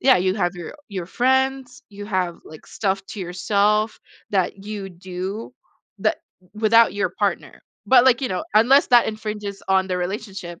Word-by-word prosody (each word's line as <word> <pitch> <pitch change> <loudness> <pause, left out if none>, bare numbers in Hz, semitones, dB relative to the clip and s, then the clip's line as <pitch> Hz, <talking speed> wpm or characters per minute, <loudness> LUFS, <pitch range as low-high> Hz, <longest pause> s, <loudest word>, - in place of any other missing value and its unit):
Yeah, 260 0 +5
you 185 +1 +1
have 185 -3 -1
your 175 -2 -8
your 190 -5 -5
friends, 265 +3 0
you 205 -1 -9
have 185 -4 -1
like 155 - -13
stuff 195 -2 -2
to 210 - -8
yourself 205 +4 +1 0.3
that 195 0 -1
you 205 -2 -5
do, 185 +6 -6 0.4
that - - 0 0.3
without 225 0 +4
your 205 +1 0
partner, - - -3 0.2
but, 255 -2 +6
like, 255 -2 +4
you 260 - -1
know, 185 - -3
unless 250 +7 +5
that 240 -2 +6
infringes 210 -2 -5
on 190 0 +3
the 185 -1 -2
relationship. 185 -2 -5
205 Hz, 165 wpm, -22 LUFS, 185-230 Hz, 0.4 s, but